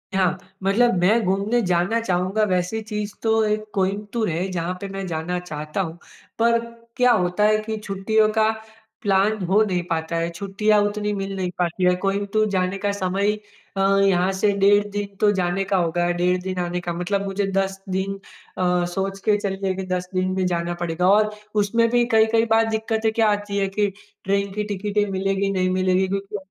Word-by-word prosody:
हाँ, 185 -1 +2 0.3
मतलब 225 +5 +3
मैं 200 +6 +4
घूमने 200 +5 +1
जाना 180 +3 +1
चाहूँगा 185 +1 0
वैसी 185 +4 0
चीज़ 210 -1 -4
तो 225 0 +3
एक 215 0 0
कोइम्बतूर 205 +3 -1
है, 170 +3 -1
जहाँ 175 0 -2
पे 200 - -4
मैं 195 0 -5
जाना 170 +2 -2
चाहता 155 0 -4
हूँ। 165 -2 -5 0.4
पर 235 0 +4 0.4
क्या 250 -1 +5
होता 180 -2 +1
है 215 0 +4
कि 220 0 -3
छुट्टियों 210 +1 +1
का 220 0 +3 0.5
प्लान 205 +1 +2
हो 195 +5 +3
नहीं 180 -4 -1
पाता 160 0 -2
है, 165 0 0
छुट्टियाँ 200 +4 +1
उतनी 210 0 -1
मिल 195 -1 -4
नहीं 185 -2 -2
पाती 175 +1 -1
हैं। 180 0 +4
कोइम्बतूर 200 +2 0
जाने 185 0 0
का 200 +1 -1
समय 195 0 -1
ही 210 0 0 0.4
अ, - - +1 0.2
यहाँ 190 -1 +3
से 200 +2 +2
डेढ़ 205 +1 +4
दिन 200 -1 -4
तो 210 - +4
जाने 190 0 0
का 195 0 0
होगा, 175 0 +1
डेढ़ 180 +1 +1
दिन 185 0 -4
आने 175 0 -2
का, 175 -1 -3
मतलब 195 +4 -1
मुझे 195 +1 -1
10 195 0 0
दिन 190 +1 -1 0.4
अ, 180 -1 +1
सोच 195 +1 -2
के 210 -1 +4
चलिए 195 -2 -2
कि 190 0 -4
10 180 0 -3
दिन 185 0 0
में 190 -1 0
जाना 175 -1 -1
पड़ेगा। 175 +1 0
और 215 +1 +4 0.3
उसमें 230 +3 +2
भी 240 0 +3
कई-कई 225 +1 +4
बार 225 0 +4
दिक्कतें 220 0 0
क्या 225 -1 +3
आती 205 0 -2
है 195 -1 +1
कि 205 -1 +3 0.4
ट्रेन 200 +1 0
की 210 +1 -2
टिकटें 205 +1 0
मिलेगी, 195 +1 0
नहीं 185 -1 +1
मिलेगी? 185 0 +2
क्योंकि 195 +2 -3
195 Hz, 190 wpm, -22 LUFS, 180-210 Hz, 0.5 s, क्या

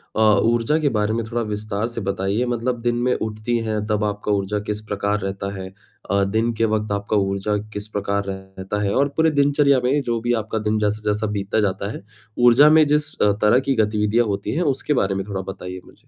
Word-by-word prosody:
अ, - - -1
ऊर्जा 115 +6 +3
के 145 -2 +2
बारे 105 -1 0
में 115 0 -1
थोड़ा 120 +1 -2
विस्तार 105 0 -3
से 115 -1 -6
बताइए। 100 +4 -1
मतलब 120 0 -2
दिन 120 0 0
में 125 0 +2
उठती 110 +2 -2
हैं, 105 -1 -1
तब 105 -1 0
आपका 105 0 -2
ऊर्जा 100 +1 0
किस 105 0 -3
प्रकार 105 0 -1
रहता 100 0 -4
है? 95 - -6 0.4
अ, 100 0 +3
दिन 110 +4 0
के 115 0 +1
वक़्त 110 -1 -1
आपका 100 +1 0
ऊर्जा 100 +1 0 0.2
किस 105 +1 -4
प्रकार 100 0 -1
रहता 95 +1 -5
है 100 - 0
और 140 +2 +3
पूरे 160 0 +4
दिनचर्या 140 -1 +3
में 140 +3 +2
जो 120 -1 0
भी 120 +1 0
आपका 110 - -4
दिन 110 0 +1
जैसा-जैसा 105 0 0
बीतता 100 +2 -1
जाता 100 0 -1
है, - - -8 0.3
ऊर्जा 125 +5 +7
में 155 0 +6
जिस 150 0 +1
अ, 105 - +5
तरह 105 +4 +5
की 135 0 0
गतिविधियाँ 105 +1 +2
होती 100 +2 -2
हैं 170 - 0
उसके 150 +2 -2
बारे 95 -6 +1
में 95 - -3
थोड़ा 95 -2 -3
बताइए 90 -1 -8
मुझे। - - -21
105 Hz, 215 wpm, -21 LUFS, 100-120 Hz, 0.4 s, ऊर्जा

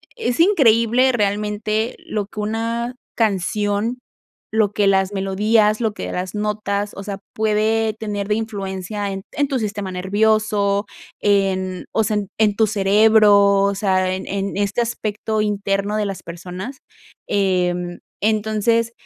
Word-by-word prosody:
es 240 +3 -2
increíble 255 - +4
realmente 210 +1 -1
lo 210 -2 -2
que 210 0 -6
una 230 +3 -2 0.2
canción, 210 +2 0 0.5
lo 215 -2 +2
que 205 - +1
las 190 0 +2
melodías, 210 +2 +2
lo 220 -3 0
que - - -5
las 185 +2 -4
notas, 210 -1 -2
o 195 - -7
sea, 200 -1 -5
puede 220 +1 +1
tener 205 -2 -4
de 210 - +1
influencia 205 -2 -4
en 195 0 -5
en 285 -1 0
tu 270 -2 -1
sistema 205 -3 -3
nervioso, 205 +1 +1 0.4
en, 190 -2 +1
o 220 - +2
sea, 215 0 0
en 205 -1 -2
en 210 -2 +3
tu 220 - +5
cerebro, 205 -1 +5
o 200 0 +1
sea, 190 -2 +1
en 190 - -5
en 195 0 -3
este 205 +3 0
aspecto 220 -2 -2
interno 200 0 -1
de 215 -1 0
las 195 -1 -5
personas, 180 +9 -7 0.5
em, 180 -3 0 0.2
entonces, 220 +2 +1
210 Hz, 140 wpm, -20 LUFS, 195-220 Hz, 0.5 s, tu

